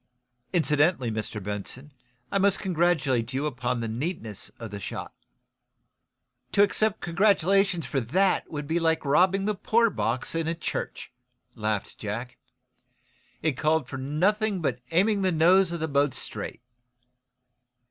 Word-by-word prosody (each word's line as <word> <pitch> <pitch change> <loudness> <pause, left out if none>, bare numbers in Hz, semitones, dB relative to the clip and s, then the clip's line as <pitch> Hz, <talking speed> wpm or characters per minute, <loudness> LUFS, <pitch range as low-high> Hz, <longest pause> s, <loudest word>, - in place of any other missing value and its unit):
Incidentally, 150 -5 +2
Mr. 110 -1 -4
Benson, 105 +8 -5 0.4
I 200 - +2
must 195 0 +3
congratulate 150 -9 +1
you 135 +3 -1
upon 125 -4 -2
the 115 - -2
neatness 115 - -4
of 115 -3 -8
the 100 - -5
shot." - - -6 1.4
"To 200 - +6
accept 215 +1 +1
congratulations 195 -1 +2
for 140 - -1
that 185 - +1
would 150 -2 -5
be 160 +4 0
like 160 -2 +1
robbing 190 +7 +3
a 210 - +2
poor 230 +3 +2
box 120 +2 -2
in 165 -1 -1
a 165 - 0
church," 165 - -4 0.4
laughed 105 -2 -3
Jack. 115 +4 -5 1.0
"It 160 - +3
called 155 +3 +1
for 135 - -6
nothing 190 +9 +1
but 130 -7 -1
aiming 200 +4 +2
the 190 -1 +2
nose 175 +3 +4
of 170 - -3
the 160 - -1
boat 140 -2 +1
straight." - - -5
160 Hz, 140 wpm, -27 LUFS, 125-190 Hz, 1.4 s, To